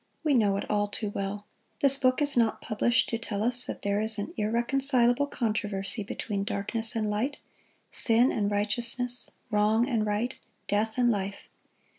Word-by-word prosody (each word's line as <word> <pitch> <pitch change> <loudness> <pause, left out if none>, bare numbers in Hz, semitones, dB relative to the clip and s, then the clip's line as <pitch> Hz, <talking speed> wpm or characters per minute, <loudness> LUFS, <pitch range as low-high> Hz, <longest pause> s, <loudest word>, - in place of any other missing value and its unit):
We 305 -2 +2
know 205 -6 +2
it - - -5
all 205 -1 0
too 205 0 -4
well. 205 +1 -5 0.4
This 275 -1 +7
book 260 +1 +1
is 290 0 +3
not 230 -3 +1
published 240 +3 0
to 230 - -2
tell 210 -3 -4
us 245 +1 +5
that - - -7
there 205 +1 0
is 220 0 +5
an 205 - -5
irreconcilable 245 +4 +1
controversy 210 -4 -2
between 200 0 -4
darkness 220 +3 -3
and 220 -1 -1
light, 225 +8 -2 0.5
sin 235 +2 +4
and 205 -2 -1
righteousness, 235 +4 0 0.2
wrong 215 +3 +2
and 230 -5 0
right, 215 +4 -2 0.3
death 215 +3 -1
and 240 -1 +3
life. 200 -2 -5
220 Hz, 165 wpm, -27 LUFS, 205-245 Hz, 0.5 s, This